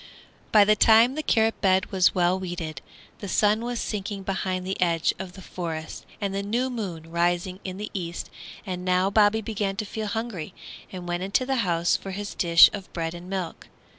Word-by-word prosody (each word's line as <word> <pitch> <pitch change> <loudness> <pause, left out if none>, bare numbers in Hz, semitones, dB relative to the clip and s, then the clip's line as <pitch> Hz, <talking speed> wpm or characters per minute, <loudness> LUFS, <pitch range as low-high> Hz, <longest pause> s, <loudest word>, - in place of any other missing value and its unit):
By 210 -2 +7
the 215 +1 +4
time 225 +4 +6
the 310 - -2
carrot 225 -6 +1
bed 190 -1 +2
was 185 -2 +4
all 180 +1 +2
weeded, 175 -5 -5 0.4
the 205 - -6
sun 210 +3 +2
was 240 -1 -3
sinking 200 -1 -4
behind 185 -1 -2
the 190 0 -3
edge 170 -2 +2
of 190 -1 -6
the 190 - -11
forest 160 -3 -6
and 200 -2 -2
the 195 - -1
new 240 +6 -1
moon 175 -9 -5
rising 175 +2 0
in 185 -1 -5
the 210 +1 -6
east, 170 -3 -5 0.3
and 180 -2 -4
now 185 +1 +2
Bobby 215 +1 +4
began 205 -2 -2
to 215 - -3
feel 215 +1 -4
hungry 220 -7 -4 0.4
and 180 -2 -7
went 175 0 -2
into 195 +7 0
the 265 0 0
house 175 -6 +1
for 195 - -5
his 205 +1 -5
dish 170 -1 +7
of 195 -2 -7
bread 165 -1 -3
and 175 +1 -9
milk. 190 -3 -4
190 Hz, 195 wpm, -25 LUFS, 175-210 Hz, 0.4 s, By